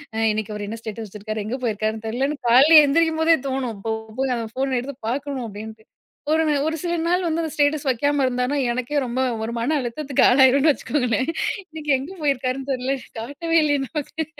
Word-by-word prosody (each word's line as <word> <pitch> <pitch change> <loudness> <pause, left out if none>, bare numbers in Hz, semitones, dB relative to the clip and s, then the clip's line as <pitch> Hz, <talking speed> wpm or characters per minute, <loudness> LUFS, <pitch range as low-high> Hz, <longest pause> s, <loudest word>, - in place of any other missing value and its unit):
அ - - -3
இன்னைக்கு 215 0 -3
அவர் 210 0 -5
என்ன 225 - -5
ஸ்டேட்டஸ் 220 0 -6
வச்சிருக்காரு? 210 +1 -5
எங்க 245 +5 -3
போயிருக்காருன்னு 220 -1 -2
தெரியலன்னு 270 +6 -1
காலையில 300 +6 +8
எந்திரிக்கும் 320 +2 +2
போதே 325 0 +5
தோணும். 260 -3 -2
இப்போ 220 +3 -4 0.3
போய் 265 -1 +1
அந்த 230 -1 -3
ஃபோன் 265 0 -1
எடுத்து 270 +2 -6
பார்க்கணும் 275 -1 -3
அப்படின்ட்டு. 220 +1 -9 0.5
ஒரு 320 0 +3 0.2
ஒரு 320 - -1
சில 345 0 -1
நாள் 360 +1 +1
வந்து 330 0 0
அந்த 315 - -4
ஸ்டேட்டஸ் 290 -1 +1
வைக்காம 285 +3 +1
இருந்தாருன்னா, 250 +3 -1
எனக்கே 255 +4 -1
ரொம்ப 255 +2 -2 0.2
ஒரு 235 - -4
மன 280 +7 0
அழுத்தத்துக்கு 270 +3 -1
ஆளாகிருவேன்னு 270 +3 +5
வச்சுக்கோங்களேன். 260 0 -1 0.4
இன்னைக்கு 310 -2 -4
எங்க 290 +8 -7
போயிருக்காருன்னு 270 -1 -1
தெரியல. 260 +2 -1 0.2
காட்டவே 330 +7 -1
இல்லையே 290 -2 +1
நமக்கு. 315 +1 -4
265 Hz, 180 wpm, -22 LUFS, 235-295 Hz, 0.5 s, காலையில